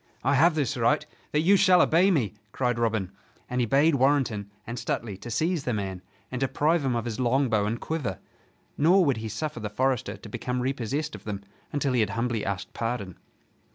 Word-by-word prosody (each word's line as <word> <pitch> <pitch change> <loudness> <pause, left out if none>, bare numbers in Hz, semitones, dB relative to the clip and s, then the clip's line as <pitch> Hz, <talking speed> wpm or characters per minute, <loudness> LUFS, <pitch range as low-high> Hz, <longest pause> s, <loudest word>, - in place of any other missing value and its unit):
"I 140 - +3
have 155 +4 +5
this 145 -3 0
right, 140 +6 +2 0.3
that 150 - +2
you 190 +5 +5
shall 185 -2 +5
obey 175 +3 +5
me!" 130 - +1 0.2
cried 125 -2 0
Robin, 110 -5 0 0.4
and 125 0 -1
he 120 - +1
bade 145 +6 +4
Warrenton 130 -7 +1 0.2
and 120 +1 -5
Stuteley 110 -4 -3
to 120 - -7
seize 155 +6 0
the 125 -4 -1
man 95 -3 -4 0.3
and 125 - -3
deprive 145 +4 +2
him 130 -3 0
of 115 -1 -2
his 115 -1 -4
longbow 120 -4 +2
and 115 +3 -2
quiver. 145 - -3 0.6
Nor 175 +5 +5
would 140 -5 +2
he 110 0 -4
suffer 150 0 -4
the 105 -1 -4
forester 115 -2 0
to 100 - -12
become 125 +4 -3
repossessed 135 +4 -2
of - - -9
them 100 -2 -4 0.3
until 140 -2 0
he 125 - +2
had 105 -3 +2
humbly 115 -2 -1
asked 95 -2 -4
pardon. 115 -6 -3
125 Hz, 200 wpm, -27 LUFS, 110-145 Hz, 0.6 s, have